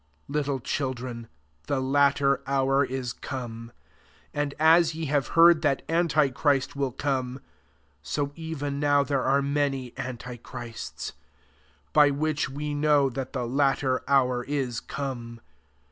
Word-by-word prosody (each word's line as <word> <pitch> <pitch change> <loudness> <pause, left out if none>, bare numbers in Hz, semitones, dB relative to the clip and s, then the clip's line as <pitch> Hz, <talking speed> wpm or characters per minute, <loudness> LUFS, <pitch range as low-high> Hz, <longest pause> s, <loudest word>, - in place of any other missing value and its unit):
18 - - -6
Little 140 -2 0
children, 125 -3 -3 0.4
the 140 - 0
latter 140 0 +3
hour 135 0 +2
is 130 -2 -3
come: 115 -3 -7 0.6
and 145 -1 -2
as 160 +1 +5
ye 160 0 -3
have 145 -1 0
heard 165 -1 +7
that 145 -4 +1
antichrist 150 -5 +2
will 140 -2 -1
come, 130 -1 -2 0.6
30 140 - -2
even 145 -3 -3
now 145 -1 +3
there 140 -1 0
are 140 +2 +2
many 140 -3 -1
antichrists; 125 -2 -7 0.8
by 150 -1 +6
which 150 0 -1
we 145 +2 -4
know 145 -2 +3
that 130 +1 -5
the 120 - -2
latter 135 0 +1
hour 125 -3 +3
is 130 -5 -2
come. 120 -4 -6
140 Hz, 130 wpm, -26 LUFS, 130-145 Hz, 0.8 s, heard